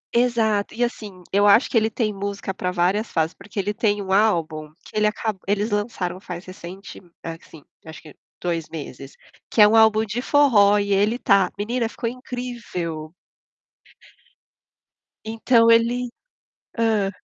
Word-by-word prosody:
Exato 225 -4 +1
e 240 - 0
assim, 205 -6 -5
eu 205 +1 +4
acho 215 +5 +6
que - - -7
ele 220 -1 +3
tem 215 -2 -1
música 200 -1 -4
pra 180 -1 -3
várias 185 +5 0
fases, 160 0 0
porque 205 0 -8
ele 205 +2 -1
tem 205 -1 0
um 190 -1 -5
álbum 165 -7 +1
que - - -15
ele 210 0 +3
aca 215 0 -2
eles 205 +2 0
lançaram 205 -4 -2
faz 180 -2 -8
recente, 185 +2 -10 0.2
assim 165 -2 -9 0.2
acho 160 0 -10
que 155 - -14 0.2
2 165 -3 -3
meses, 140 -3 -8 0.4
que - - -3
é 210 - +9
um 220 - +3
álbum 220 0 +5
de 220 +4 -3
forró 225 -9 +4
e 200 -1 0
ele 210 +5 +2
tá. 200 -7 +3
Menina 230 +2 -1
ficou 230 - -5
incrível. 230 -11 -6 2.1
Então 230 +1 +3
ele 240 +2 +2 0.7
hã? 220 -4 +1
205 Hz, 155 wpm, -22 LUFS, 180-225 Hz, 2.1 s, é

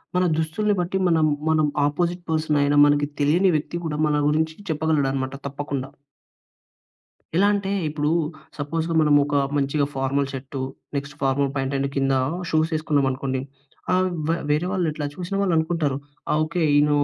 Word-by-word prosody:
మన 180 - +3
దుస్తుల్ని 190 +7 0
బట్టి 180 +2 -1
మనం, 160 -2 +3 0.2
మనం 155 -1 +3 0.2
ఆపోసిట్ 175 +4 -1
పర్సన్ 155 -2 +1
అయినా 145 0 +2
మనకి 145 0 +3
తెలియని 175 +6 +4
వ్యక్తి 155 +3 -2
కూడా, 150 -2 -2
మన 150 -1 +1
గురించి 160 +1 +1
చెప్పగలడు 155 -2 +1
అనమాట 130 0 -2
తప్పకుండా. 140 -1 -4 1.5
ఎలా 200 +2 +5
అంటే, 200 -1 -1 0.2
ఇప్పుడూ 150 0 -1 0.5
సపోజ్‌గా 165 +3 -2
మనం 150 -1 +4
ఒక 145 0 -4 0.2
మంచిగా 140 +1 +1
formal 135 +1 0
shirt, 135 0 -6 0.4
next 140 +1 -4
formal 135 +1 +1
pant 135 0 -1
and 140 0 0
కింద 135 0 +2 0.4
షూస్ 160 +1 +1
ఏసుకున్నాం 150 -3 +1
అనుకోండి. 130 0 -2 0.5
ఆహ్, 185 0 +3 0.2
వ్ - - +2 0.2
వేరే 150 +4 +2
వాళ్ళు 180 -4 0
ఇట్లా 150 -1 -4
చూసిన 185 +2 -4
వాళ్ళు 185 -3 +1
అనుకుంటారు. 160 -4 0 0.3
ఆ - - +3
ఓకే 165 +2 -2 0.2
ఈయన 150 0 +4
150 Hz, 160 wpm, -23 LUFS, 140-165 Hz, 1.5 s, ఎలా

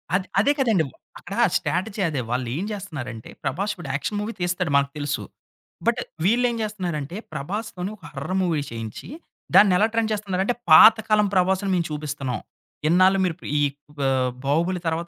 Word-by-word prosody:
అద్ 185 0 0
అదే 250 +8 +4
కదండి. 225 -10 +3 0.4
అక్కడ - - -8 0.2
స్ట్రాటజీ 185 +7 -2
అదే 145 -5 -2
వాళ్ళు 125 0 -1
ఏం 185 - -2
జేస్తున్నారంటే 145 - -6
'ప్రభాస్' 195 +10 -1
ఇపుడు 175 -6 -8
యాక్షన్ 150 +9 -2
మూవీ 210 +2 -3
తీస్తాడు 175 -2 -1
మనకు 140 0 +3
తెలుసు. 145 -2 -2 0.6
బట్ - - +2 0.3
వీళ్ళు 235 +5 +3
ఏం 235 - -3
చేస్తున్నారంటే, 180 -7 -3
'ప్రభాస్‌తోని' 200 +3 -4
ఒక 190 - -29
హారర్ 145 +7 -4
మూవీ 165 -5 0
చేయించి. 115 -2 -7 0.5
దాన్ని 200 -3 +7
ఎలా 210 +4 +4
ట్రెండ్ 225 -1 +1
చేస్తున్నారంటే 200 +1 -1 0.2
"పాతకాలం 215 +3 +7
'ప్రభాస్‌ని' 190 +1 +2
మేము 170 -2 0
చూపిస్తున్నాం. 145 -4 -3 0.5
ఇన్నాళ్లు 185 +4 +5
మీరు 175 - 0
ఇపుడు - - -9
ఈ - - +2 0.4
పా 135 - +1 0.4
'బాహుబలి' 170 +6 +1
తర్వాత 165 +1 -1
180 Hz, 160 wpm, -24 LUFS, 145-205 Hz, 0.6 s, దాన్ని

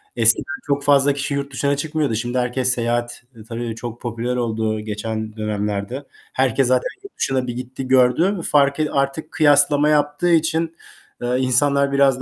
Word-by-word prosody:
Eskiden 115 +7 +2
çok 140 0 0
fazla 140 0 +4
kişi 140 0 -3
yurt 140 0 -3
dışına 140 +2 0
çıkmıyordu. 150 -4 -1
Şimdi 120 +3 -2
herkes 125 +1 +1
seyahat, 120 0 -2
eee, 110 - -12
tabii 115 -1 -4
çok 120 0 -7
popüler 120 +1 -3
oldu 110 -2 -1
geçen 110 +1 -5
dönemlerde. 105 +4 -3 0.3
Herkes 130 0 +2
zaten 130 0 +1
yurt 400 - -13
dışına 130 -1 -1
bir 120 - -3
gitti, 125 +1 -6
gördü. 130 +9 +3
Farkı 145 +1 +3
artık 140 +3 -1
kıyaslama 145 -1 +4
yaptığı 150 +3 +1
için, 165 0 +1 0.5
eee, 120 +1 0
insanlar 140 +2 +2
biraz 135 -2 +3
130 Hz, 155 wpm, -20 LUFS, 120-145 Hz, 0.5 s, fazla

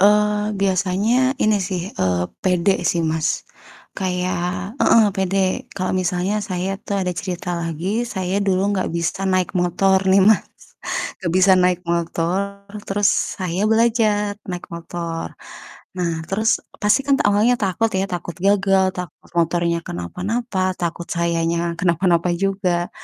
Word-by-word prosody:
Eee, 210 +1 +3
biasanya 200 +7 +2
ini 215 -1 +4
sih, 185 -2 -2 0.2
eee, 90 -1 +1 0.2
pede 180 +1 +3 0.2
sih 170 - 0
Mas, 160 0 0 0.5
kayak 180 +1 -2
heeh, 230 - +6
pede. 190 0 0
Kalo 185 -1 -1
misalnya 185 +3 0
saya 185 -2 -3
tuh 200 - -3
ada 180 - -1
cerita 180 0 -5
lagi, 165 +1 -3 0.2
saya 190 -2 -1
dulu 190 -2 +1
nggak 190 -2 -1
bisa 170 +3 -2
naik 185 -1 +1
motor 190 +2 +3
nih 190 +1 +6
Mas, 215 0 +5 0.8
nggak 170 -3 -2
bisa 190 +1 +6
naik 180 0 +2
motor 180 +4 -1 0.2
terus 200 0 +2 0.3
saya 185 0 -2
belajar 220 -3 +2 0.2
naik 180 -1 -5
motor. 170 -1 -5 0.6
Nah, 175 -2 0 0.2
terus 220 +5 +1 0.2
pasti 210 +4 +4
kan 280 -1 +4
awalnya 210 +4 +3
takut 205 +4 +1
ya, 190 0 +1
takut 175 -2 -5
gagal, 195 -1 +4
takut 180 -3 -8
motornya 170 0 +1
kenapa-napa, 185 - -2
takut 170 0 -3
sayanya 170 0 0
kenapa-napa 175 0 +2
juga. 185 -3 0
185 Hz, 135 wpm, -21 LUFS, 175-200 Hz, 0.8 s, heeh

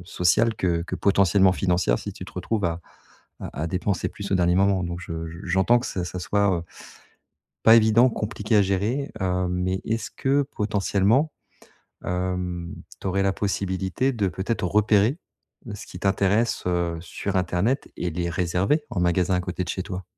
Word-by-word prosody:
sociale 95 +6 +2
que 85 -2 0
que 90 - -5
potentiellement 95 -1 +4
financière 90 -10 +1
si - - -6
tu - - -9
te - - -12
retrouves 110 -3 -2
à 85 0 -1 0.6
à 75 - -6
à - - -1
dépenser 95 +1 -1
plus 100 -1 -8
au - - +4
dernier 90 0 +2
moment. 95 -1 +3
Donc, 85 0 -5
je 80 -2 -5
je, 85 +1 -9
j'entends 95 +7 +3
que - - -5
ça 90 -2 -3
ça 90 +1 -5
soit 95 -4 +1 1.0
pas 110 - +8
évident, 115 +3 +5
compliqué 105 0 -2
à - - +6
gérer, 105 +9 -1
hem. 90 -1 0
Mais, 90 +1 -1
est-ce 115 0 -2
que, 140 +1 +1
potentiellement, 105 +4 +1 0.7
hem, 90 -1 -3 0.3
tu - - -6
aurais 95 +1 +1
la 95 - +2
possibilité 95 +6 -1
de, 105 -5 0
peut-être, 95 +3 -3
repérer 105 - +3 0.6
ce - - -9
qui 90 - -9
t'intéresse, 100 +4 +1
heu, 85 -2 0
sur 100 +3 -5
internet 95 - 0
et 90 - -2
les 85 +1 -2
réserver 90 - 0
en 100 - -2
magasin 90 +1 +2
à 90 - +1
côté 90 0 -3
de - - -10
chez 95 - -3
toi? 95 -1 -6
95 Hz, 175 wpm, -24 LUFS, 90-105 Hz, 1.0 s, pas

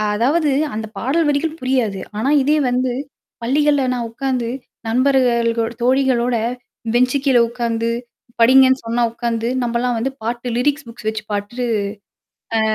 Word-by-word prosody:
அ - - 0
அதாவது 290 +7 +2 0.2
அந்த 220 +1 -3
பாடல் 300 +8 +1
வரிகள் 310 +3 0
புரியாது. 250 -7 0 0.2
ஆனா, 260 +5 +1
இதே 300 +3 +3
வந்து 250 0 0 0.5
பள்ளிகள்ல 285 +2 +2
நான் 235 -2 -3
உக்காந்து 255 -1 -2 0.4
நண்பர்கள் 245 -1 +3
கூட் 230 0 -1
தோழிகளோட 250 -1 +2 0.6
பெஞ்சு 250 +3 +3
கீழ 270 -3 +3
உட்கார்ந்து 230 -1 -2 0.5
படிங்கன்னு 260 +2 +6
சொன்னா 235 +1 0
உக்காந்து 230 -1 -2
நம்மலாம் 240 0 0
வந்து 260 +4 -1
பாட்டு 240 +2 -3
லிரிக்ஸ் 285 +3 0
புக்ஸ் 230 -2 -6
வச்சு 220 0 -5
பாட்டு 205 +5 -3 0.9
ஆ. - - +3
245 Hz, 135 wpm, -19 LUFS, 230-265 Hz, 0.9 s, படிங்கன்னு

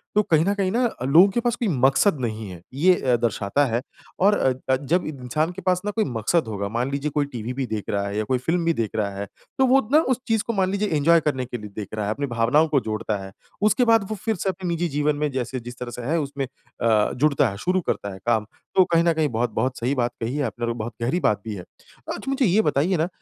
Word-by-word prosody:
तो 210 - +6
कहीं 160 0 +5
न 200 - +2
कहीं 190 -2 0
ना 240 +4 +1 0.2
लोगों 160 +9 +7
के - - +1
पास 240 0 0
कोई 240 -3 -2
मकसद 140 +3 +3
नहीं 110 -2 -3
है। 90 -2 -10
ये 180 +7 +4
अ, 125 -2 +3
दर्शाता 115 +4 +1
है 120 -1 -1 0.4
और 205 +2 +4 0.3
अ, 130 - +5
जब 150 +7 0
इंसान 150 +3 -2
के 190 +2 -8
पास 180 0 +1
ना 210 - 0
कोई 220 +1 0
मकसद 120 +4 0
होगा 100 -2 -3
मान 120 +5 -1
लीजिए 140 +2 -1
कोई 145 -1 +1
टीवी 125 -3 -5
भी 135 +1 -2
देख 110 -2 -3
रहा 100 0 -1
है 100 +1 -4
या 110 - +1
कोई 125 +4 0
फ़िल्म 165 +6 -1
भी 165 - +3
देख 115 -6 -1
रहा 105 -2 0
है 100 - -4 0.3
तो 265 - +4
वो 265 +2 +5
ना 305 - +7
उस 250 - -3
चीज़ 225 -2 +1
को 230 - 0
मान 190 -3 +1
लीजिए 200 +1 0
एन्जॉय 165 +3 +5
करने 145 -5 -1
के 120 0 -5
लिए 105 -2 -9
देख 105 -3 -5
रहा 105 -1 -2
है। 105 - 0
अपनी 140 +5 -3
भावनाओं 120 +6 +3
को 150 -3 +2
जोड़ता 110 -1 -2
है। 95 - -9 0.3
उसके 215 +4 +3
बाद 225 -4 +4
वो 215 - -2
फ़िर 220 +2 -2
से 190 +1 -2
अपने 185 0 -4
निजी 170 0 0
जीवन 150 +1 +1
में 150 0 -1
जैसे 130 0 -3
जिस 120 +1 -10
तरह 125 -1 -5
से 120 - -7
है 155 +8 0
उसमें 140 -2 -3
अ, 115 -4 -1
जुड़ता 140 -2 +3
है, 100 - -7
शुरू 180 - 0
करता 100 -10 -3
है 95 - -10
काम। 110 -2 +2 0.3
तो 190 - +7
कहीं 165 0 +4
न 170 - +4
कहीं 160 -1 +1
बहुत-बहुत 120 +2 -1
सही 125 +4 0
बात 120 -2 0
कही 115 +4 -2
है 145 - 0
आपने 120 -2 -3
और 115 - -1
बहुत 115 0 -5
गहरी 130 +10 +1
बात 105 - +1
भी 110 - -3
है। 90 - -6 0.5
अच्छा 270 - -6
मुझे 270 -1 +2
ये 205 +2 +4
बताइए 150 +4 +1
ना, 160 +2 +1
140 Hz, 270 wpm, -23 LUFS, 115-180 Hz, 0.5 s, लोगों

